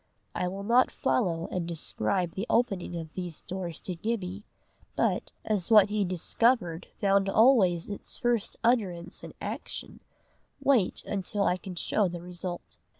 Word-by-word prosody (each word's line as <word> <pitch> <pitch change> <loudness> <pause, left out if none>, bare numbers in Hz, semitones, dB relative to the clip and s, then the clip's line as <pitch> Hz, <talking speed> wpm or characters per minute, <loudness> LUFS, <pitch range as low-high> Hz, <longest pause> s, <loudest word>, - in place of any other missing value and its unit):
I 180 - -1
will 195 +2 -5
not 240 +4 +4
follow 170 -8 0
and 180 -2 -2
describe 165 - -1
the 195 +7 -4
opening 195 -7 +1
of 160 -2 -7
these 175 -4 -5
doors 180 -3 -5
to 185 - -3
Gibbie, 200 0 -3 0.5
but, - - 0
as 205 -5 0
what 210 -3 +7
he 210 0 +1
discovered 185 0 +1
found 195 -1 +3
always 195 -7 +4
its 205 - -6
first 240 -3 0
utterance 195 -8 0
in - - -9
action, - - -5 0.6
wait 250 -9 +2
until 200 +1 -1
I 180 - +2
can 185 0 -8
show 200 +3 +1
the 175 -1 -6
result. 180 0 -7
190 Hz, 150 wpm, -29 LUFS, 175-210 Hz, 0.6 s, what